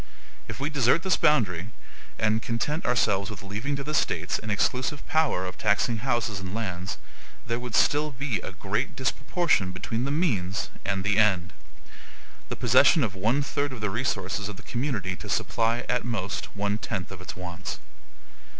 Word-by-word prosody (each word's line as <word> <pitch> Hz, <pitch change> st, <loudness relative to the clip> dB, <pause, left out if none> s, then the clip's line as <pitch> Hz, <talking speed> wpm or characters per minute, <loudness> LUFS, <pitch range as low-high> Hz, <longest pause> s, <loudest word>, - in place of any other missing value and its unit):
If -, -, -6 dB
we 145 Hz, +3 st, -1 dB
desert 145 Hz, +3 st, +3 dB
this 190 Hz, -, +3 dB
boundary 100 Hz, -, +2 dB, 0.5 s
and 110 Hz, +1 st, +2 dB
content 135 Hz, +9 st, -1 dB
ourselves 100 Hz, -5 st, +2 dB
with 100 Hz, -3 st, -8 dB
leaving 110 Hz, +9 st, -2 dB
to 140 Hz, -, -4 dB
the 150 Hz, +2 st, -4 dB
States 90 Hz, -, +1 dB
an 110 Hz, -, -6 dB
exclusive 125 Hz, +7 st, 0 dB
power 155 Hz, -, +2 dB
of 90 Hz, 0 st, -6 dB
taxing 105 Hz, +2 st, +2 dB
houses 120 Hz, -3 st, 0 dB
and 95 Hz, +1 st, -5 dB
lands, 95 Hz, -4 st, -3 dB, 0.5 s
there 115 Hz, +1 st, -1 dB
would 125 Hz, -2 st, -4 dB
still 150 Hz, +1 st, +3 dB
be 130 Hz, -6 st, -2 dB
a -, -, -6 dB
great 100 Hz, +7 st, -2 dB
disproportion 130 Hz, -, +1 dB
between 115 Hz, +6 st, -2 dB
the -, -, -1 dB
MEANS 110 Hz, -, 0 dB
and 100 Hz, -1 st, -1 dB
the 105 Hz, +1 st, +3 dB
END; 95 Hz, -5 st, +3 dB, 1.0 s
the -, -, -2 dB
possession 155 Hz, -, +5 dB
of 105 Hz, -4 st, -1 dB
one 115 Hz, +9 st, +1 dB
third 145 Hz, 0 st, -1 dB
of 130 Hz, -, -6 dB
the 105 Hz, -2 st, 0 dB
resources 105 Hz, -3 st, -1 dB
of 105 Hz, -, -7 dB
the 110 Hz, -, -12 dB
community 115 Hz, -9 st, -2 dB
to -, -, -9 dB
supply, 115 Hz, +1 st, +1 dB
at 125 Hz, -1 st, +1 dB
most, 110 Hz, -2 st, -2 dB
one 105 Hz, +1 st, 0 dB
tenth 95 Hz, -3 st, -4 dB
of 95 Hz, -1 st, -8 dB
its 90 Hz, -, -7 dB
wants. 90 Hz, -2 st, -5 dB
110 Hz, 175 wpm, -27 LUFS, 95-130 Hz, 1.0 s, possession